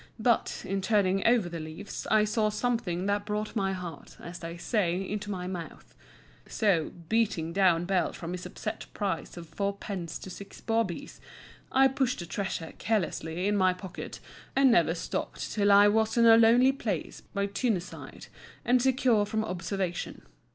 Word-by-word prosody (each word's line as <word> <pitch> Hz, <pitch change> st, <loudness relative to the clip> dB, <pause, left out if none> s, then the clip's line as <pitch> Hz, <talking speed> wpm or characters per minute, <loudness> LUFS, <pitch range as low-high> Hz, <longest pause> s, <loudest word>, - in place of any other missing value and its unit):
But, 230 Hz, 0 st, +1 dB
in 195 Hz, +1 st, -1 dB
turning 195 Hz, -2 st, +2 dB
over 235 Hz, -6 st, +4 dB
the 170 Hz, -1 st, -5 dB
leaves, 160 Hz, +6 st, -7 dB
I 215 Hz, -1 st, +5 dB
saw 215 Hz, 0 st, +1 dB
something 210 Hz, -5 st, -1 dB
that 205 Hz, 0 st, 0 dB
brought 210 Hz, +2 st, -3 dB
my 195 Hz, -3 st, +1 dB
heart, 175 Hz, -5 st, -8 dB
as 170 Hz, +1 st, -8 dB
they 165 Hz, 0 st, -6 dB
say, 180 Hz, -2 st, 0 dB
into 210 Hz, 0 st, -4 dB
my 185 Hz, -3 st, -3 dB
mouth. 180 Hz, -3 st, -7 dB, 0.5 s
So, 190 Hz, -8 st, +1 dB, 0.2 s
beating 175 Hz, -7 st, 0 dB
down 180 Hz, -3 st, +3 dB
Bell 185 Hz, -1 st, +1 dB
from 170 Hz, 0 st, -7 dB
his 180 Hz, 0 st, -5 dB
upset 215 Hz, +4 st, -6 dB
price 200 Hz, -3 st, -3 dB
of 170 Hz, -1 st, -8 dB
fourpence 200 Hz, -3 st, -4 dB
to 190 Hz, -, -8 dB
six 200 Hz, +2 st, -10 dB
bawbees, 225 Hz, -6 st, -2 dB, 0.5 s
I 270 Hz, +1 st, +6 dB
pushed 265 Hz, -1 st, 0 dB
the 175 Hz, -, -5 dB
treasure 175 Hz, -2 st, -4 dB
carelessly 180 Hz, -4 st, -1 dB
in 210 Hz, -, +2 dB
my 185 Hz, -2 st, +4 dB
pocket, 185 Hz, -1 st, -8 dB, 0.4 s
and 270 Hz, -1 st, +5 dB
never 170 Hz, -5 st, +4 dB
stopped -, -, -4 dB
till 205 Hz, -1 st, +3 dB
I 200 Hz, +1 st, +8 dB
was 220 Hz, +2 st, +2 dB
in 230 Hz, -, +6 dB
a 225 Hz, -1 st, +9 dB
lonely 235 Hz, +3 st, +6 dB
place 215 Hz, -, -4 dB
by 200 Hz, 0 st, -3 dB
Tyne 200 Hz, +1 st, 0 dB
side 175 Hz, -, -10 dB, 0.4 s
and 245 Hz, +1 st, +4 dB
secure 255 Hz, -4 st, +3 dB
from 220 Hz, +1 st, -1 dB
observation. 180 Hz, -1 st, -3 dB
200 Hz, 165 wpm, -29 LUFS, 180-220 Hz, 0.5 s, a